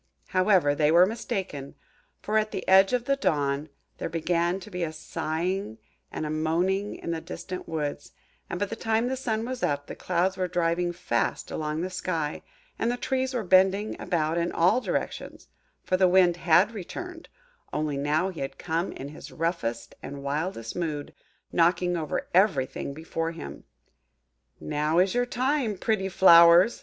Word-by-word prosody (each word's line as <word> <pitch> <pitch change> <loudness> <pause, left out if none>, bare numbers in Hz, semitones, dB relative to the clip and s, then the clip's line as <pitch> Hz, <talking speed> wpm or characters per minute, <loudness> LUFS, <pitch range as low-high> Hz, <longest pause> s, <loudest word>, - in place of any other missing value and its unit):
However, 185 -6 +3
they 150 +1 +2
were 175 +2 +7
mistaken; 190 - -4 0.5
for, 215 +1 +2
at 215 0 -1
the - - -5
edge 190 +1 +6
of 245 -1 0
the 275 - +2
dawn, 145 - 0 0.3
there - - -3
began 170 +2 0
to 210 - -11
be 180 -1 -4
a 165 -2 -1
sighing 160 - -3 0.3
and - - -4
a 150 - -3
moaning 175 +6 0
in 170 - -5
the 165 -1 -3
distant 185 +1 -7
woods, 150 -3 -4 0.4
and 175 - -4
by 205 - +1
the 215 - -6
time 225 +1 0
the 265 - -1
sun 225 -4 -2
was 255 0 -5
up, 145 0 0
the - - -7
clouds 185 +1 0
were 185 -1 0
driving 175 0 0
fast 175 +1 -2
along 155 0 -2
the 185 - -2
sky, 165 -5 -3 0.4
and 230 - +1
the 245 - -2
trees 260 0 -1
were 235 - -1
bending 190 +3 +3
about 165 -1 0
in 170 +1 -1
all 180 +9 +3
directions; - - -4 0.3
for 185 - +1
the 185 0 +5
Wind 180 -1 +5
had 175 +5 +4
returned,–only 350 - -7
now 150 +6 +1
he 180 - -8
had 135 0 -5
come 165 +2 -2
in 140 - -7
his 150 - -11
roughest 160 -9 -3
and 140 0 -7
wildest 140 -4 -3
mood,–knocking 170 +2 -1
over 155 -3 -3
everything 165 -9 +2
before 165 +1 -3
him. 165 - -9 0.9
"Now 150 +2 -1
is 185 +2 +4
your 245 0 +1
time, 250 -3 0
pretty 205 -3 0
flowers!" 170 +2 +7
175 Hz, 165 wpm, -27 LUFS, 155-200 Hz, 0.9 s, were